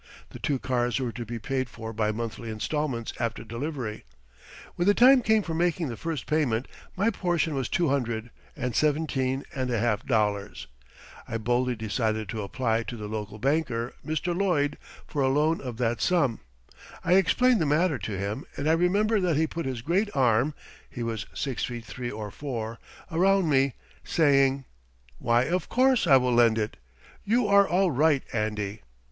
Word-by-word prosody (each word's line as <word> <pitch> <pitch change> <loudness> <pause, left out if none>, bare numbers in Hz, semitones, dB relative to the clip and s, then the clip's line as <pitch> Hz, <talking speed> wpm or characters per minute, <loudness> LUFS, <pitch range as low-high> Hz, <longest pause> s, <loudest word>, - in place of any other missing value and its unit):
The - - -9
two 140 - 0
cars 125 -1 0
were 125 -3 -2
to 120 0 -7
be 120 - -4
paid 130 +2 -2
for 115 -1 -7
by 105 0 0
monthly 115 +1 -5
installments 120 +2 -2
after 115 -2 -2
delivery. 115 -1 -5 0.7
When 175 - -1
the 205 - +5
time 260 +1 +7
came 220 -2 +3
for 165 - -4
making 170 -2 0
the 115 - -4
first 160 +1 -4
payment, 135 -6 0 0.3
my 205 +5 +2
portion 175 -5 0
was 135 -4 -2
two 170 -4 +1
hundred 120 -4 -1 0.2
and 125 -2 -3
seventeen 140 -3 0
and 130 -2 -2
a 120 - 0
half 110 -1 0
dollars. 105 -4 -1 0.6
I 115 - -2
boldly 120 +2 0
decided 110 -1 -2
to 110 +2 -3
apply 115 +2 0
to 120 +1 -6
the 105 -1 -6
local 105 0 -5
banker, 130 -2 0
Mr. 160 +3 -2
Lloyd, 160 -7 +1 0.3
for 145 - -3
a 135 - +3
loan 150 +4 +2
of 125 -4 -6
that 120 -1 0
sum. 145 -11 +2 0.7
I - - +3
explained 230 +5 +4
the 155 - +1
matter 150 -1 +2
to 100 0 -4
him, 100 +7 -3
and 145 - -2
I 160 - +5
remember 200 +6 +2
that 175 -5 +1
he 160 - +3
put 165 -1 -4
his 125 -3 -4
great 190 - +1
arm 130 +2 +2 0.3
(he 120 - -5
was 115 -2 -3
six 135 -4 -2
feet 120 -2 -4
three 120 +1 -5
or 105 -2 -6
four) 115 -5 -5 0.3
around 190 +2 +3
me, 135 -1 +3 0.3
saying: 135 -4 +3 0.5
"Why, 120 +1 +3
of 175 +7 -1
course 255 -5 +3
I 135 -3 +8
will 125 -1 +1
lend 120 -2 +5
it. 110 0 -2 0.5
You 230 +2 +2
are 200 -1 +5
all 185 0 +2
right, 145 +1 +3
Andy." 105 -1 -2
130 Hz, 180 wpm, -27 LUFS, 115-160 Hz, 0.7 s, I